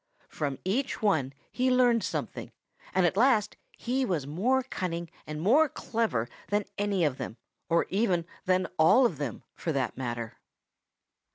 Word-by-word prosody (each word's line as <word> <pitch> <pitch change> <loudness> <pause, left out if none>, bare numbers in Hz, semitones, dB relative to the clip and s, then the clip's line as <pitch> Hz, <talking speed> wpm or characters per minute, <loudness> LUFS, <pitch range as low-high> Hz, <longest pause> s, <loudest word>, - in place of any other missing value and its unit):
From 140 -3 -3
each 245 +5 -1
one 155 -11 +2 0.2
he 255 +1 +1
learned 245 -3 +4
something, - - -4 0.4
and 185 -1 +3
at 175 - +2
last 220 -2 +3 0.2
he 260 +2 -1
was 175 - -1
more 230 - +1
cunning 170 -8 -4 0.2
and 150 0 -5
more 275 - +4
clever 220 - -1 0.2
than 205 0 0
any 200 -4 +1
of 140 -3 -1
them 115 - -5 0.3
or 170 0 +3
even 190 -4 +1 0.2
than 185 0 +2
all 200 +11 +6
of 175 - 0
them, 135 -7 -4
for 165 - -3
that 135 -2 -1
matter. 120 -3 -4
185 Hz, 155 wpm, -29 LUFS, 155-235 Hz, 0.4 s, all